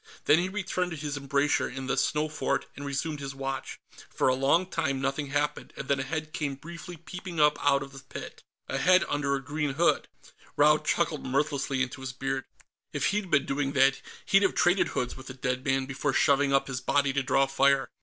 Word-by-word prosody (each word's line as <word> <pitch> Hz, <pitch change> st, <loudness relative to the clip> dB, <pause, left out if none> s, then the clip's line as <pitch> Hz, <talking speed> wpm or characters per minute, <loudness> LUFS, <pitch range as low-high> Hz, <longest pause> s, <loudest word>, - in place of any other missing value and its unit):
Then 155 Hz, -, +6 dB
he 180 Hz, +2 st, -1 dB
returned 190 Hz, -2 st, -2 dB
to 160 Hz, -, -6 dB
his 145 Hz, -1 st, -4 dB
embrasure 140 Hz, +1 st, +1 dB
in 135 Hz, 0 st, -6 dB
the 135 Hz, -, 0 dB
snow 150 Hz, +1 st, +1 dB
fort 150 Hz, -2 st, -1 dB
and 145 Hz, -, -8 dB
resumed 145 Hz, +2 st, -3 dB
his 135 Hz, -1 st, -6 dB
watch. 135 Hz, -1 st, -4 dB, 0.3 s
For -, -, +1 dB
a -, -, +3 dB
long 135 Hz, +7 st, +3 dB
time, 160 Hz, -7 st, -1 dB
nothing 135 Hz, +2 st, -1 dB
happened, 145 Hz, +1 st, -2 dB
and 135 Hz, -, -6 dB
then 140 Hz, -1 st, +1 dB
a -, -, -1 dB
head 155 Hz, +2 st, -4 dB
came 140 Hz, -3 st, -2 dB
briefly 170 Hz, +4 st, -9 dB
peeping 175 Hz, +1 st, -7 dB
up 150 Hz, 0 st, +3 dB
out 140 Hz, -1 st, +3 dB
of 135 Hz, -, -11 dB
the 135 Hz, -, -10 dB
pit. 130 Hz, -, -9 dB, 0.3 s
A 135 Hz, -, -2 dB
head 185 Hz, +5 st, +5 dB
under 145 Hz, -1 st, 0 dB
a 135 Hz, -, -4 dB
green 145 Hz, 0 st, -2 dB
hood. 170 Hz, +3 st, +2 dB, 0.5 s
Raud 150 Hz, +1 st, +5 dB
chuckled 165 Hz, -3 st, 0 dB
mirthlessly 135 Hz, 0 st, 0 dB
into 130 Hz, 0 st, -6 dB
his 130 Hz, -1 st, -5 dB
beard. 135 Hz, 0 st, -3 dB, 0.5 s
If -, -, 0 dB
he'd 205 Hz, -2 st, -2 dB
been 140 Hz, -, +3 dB
doing 140 Hz, 0 st, -1 dB
that, 135 Hz, 0 st, +4 dB, 0.2 s
he'd 195 Hz, -, +5 dB
have 195 Hz, -, +2 dB
traded 180 Hz, +2 st, +3 dB
hoods 125 Hz, -1 st, -3 dB
with 130 Hz, 0 st, -11 dB
the 130 Hz, -, -7 dB
dead 125 Hz, 0 st, -2 dB
man 135 Hz, -1 st, +1 dB
before 135 Hz, +1 st, -2 dB
shoving 140 Hz, 0 st, +3 dB
up 135 Hz, 0 st, +3 dB
his 125 Hz, -2 st, -4 dB
body 140 Hz, -1 st, +2 dB
to 140 Hz, -, +1 dB
draw 135 Hz, +1 st, +3 dB
fire. 135 Hz, 0 st, +3 dB
140 Hz, 215 wpm, -28 LUFS, 135-155 Hz, 0.5 s, Then